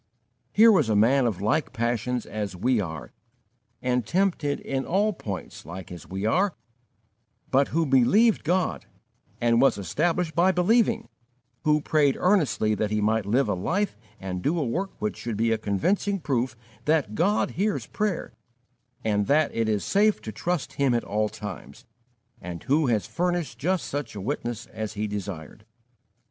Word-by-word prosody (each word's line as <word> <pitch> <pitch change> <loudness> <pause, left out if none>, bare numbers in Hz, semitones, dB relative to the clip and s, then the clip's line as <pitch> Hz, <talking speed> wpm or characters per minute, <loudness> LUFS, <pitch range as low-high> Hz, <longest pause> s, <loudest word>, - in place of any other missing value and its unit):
Here 225 +2 +7
was 155 - +3
a 110 - +2
man 125 +5 +4
of 100 -5 -3
like 130 +4 0
passions 120 +1 -1
as 105 -3 -4
we 120 +6 +1
are 80 -5 -6 0.7
and 125 -1 +1
tempted 170 - 0
in 135 -1 -2
all 205 +7 +1
points 100 - -7
like 90 +1 -9
as 85 -3 -9
we 95 +2 -4
are, 185 - +2 1.0
but 135 +1 +4
who 165 +1 0
believed 175 - +4
God 165 - 0 0.5
and 120 0 +3
was 135 - +4
established 160 - 0
by 175 +4 +4
believing; 225 +5 +2 0.6
who 150 0 +3
prayed 145 -3 +2
earnestly 165 - +2
that 105 0 -1
he 105 0 0
might 110 0 +1
live 120 +4 +2
a 105 - +1
life 175 - -1 0.2
and 90 -1 -4
do 160 - 0
a 155 - 0
work 180 +12 -2
which 105 - -2
should 115 -3 -4
be 115 +1 +2
a 110 - +1
convincing 190 - 0
proof 125 -6 -1 0.3
that 150 -8 +1
God 195 - +1
hears 205 +4 -1
prayer 210 -5 -2 0.7
and 105 -2 +1
that 150 +2 +3
it 115 -1 0
is 105 -2 0
safe 210 +1 +3
to 110 - -5
trust 170 - -2
Him 135 -3 +2
at 120 - 0
all 105 +1 0
times; 100 -10 -9 0.6
and 85 -1 -7
who 145 +2 +2
has 110 -4 +1
furnished 175 -9 -2
just 180 +5 0
such 145 -5 -4
a - - -5
witness 120 0 -3
as 110 -1 -6
he 105 0 -2
desired. 100 -3 -6
125 Hz, 165 wpm, -26 LUFS, 105-170 Hz, 1.0 s, Here